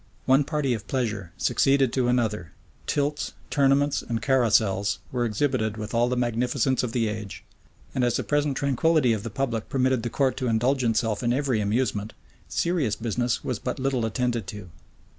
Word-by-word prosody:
One 135 +2 +5
party 145 -3 -1
of 110 -2 -5
pleasure 105 -9 -2
succeeded 135 +5 +2
to 130 -2 +1
another: 110 -8 0 0.3
tilts, 145 +1 -1 0.2
tournaments, 140 0 +3
and 115 -2 -3
carousals 110 -5 +2
were 120 -2 0
exhibited 110 -1 0
with 105 -1 -6
all 120 +1 +2
the 125 - -1
magnificence 125 +2 +1
of 125 - -3
the 115 -2 0
age; 105 -2 -6 0.5
and 130 - 0
as 120 -1 +2
the - - -2
present 145 -2 0
tranquillity 140 -1 +2
of 110 - -2
the 115 - -5
public 115 -1 -2
permitted 130 -2 +1
the 120 - -3
court 135 +1 0
to 130 - -2
indulge 125 +4 +1
itself 115 -2 +1
in 120 -1 +1
every 130 -4 +1
amusement, 105 0 -1 0.4
serious 160 - 0
business 120 +2 -1
was 125 -5 -2
but 125 - -3
little 130 -3 0
attended 115 -1 -1
to. 105 -5 -8
120 Hz, 175 wpm, -25 LUFS, 110-135 Hz, 0.5 s, One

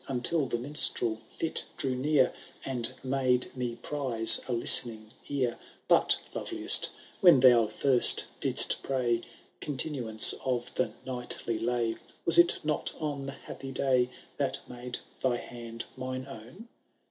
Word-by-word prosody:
* - - -25
Until 135 +3 -4
the 120 - -5
minstrel 120 -4 +4
fit 165 - -4
drew 130 - -4
near. 130 0 -2 0.3
And 125 -2 -2
made 130 -1 -3
me 125 -2 -7
prize 125 -7 +2
a - - -7
listening 115 -2 +3 0.2
ear. 130 -4 -5 0.3
But, - - +2 0.2
loveliest, - - +5 0.3
when 175 -7 +3
thou 120 -3 +2
first 130 +2 +6
didst - - +4
pray 120 -3 -4 0.4
Continuance 130 -6 +2
of 125 -1 -6
the 130 - -5
knightly 120 -3 -7
lay, 115 -1 -4 0.3
Was 170 - +3
it 170 0 +2
not 150 -1 -4
on 145 -3 -7
the 135 - -9
happy 135 -1 -12
day 130 -2 -2 0.3
That 135 -1 -3
made 125 0 -9 0.2
thy 125 -2 -2
hand 115 -1 -11
mine 130 0 -8
own 135 - -15
130 Hz, 135 wpm, -26 LUFS, 120-135 Hz, 0.4 s, first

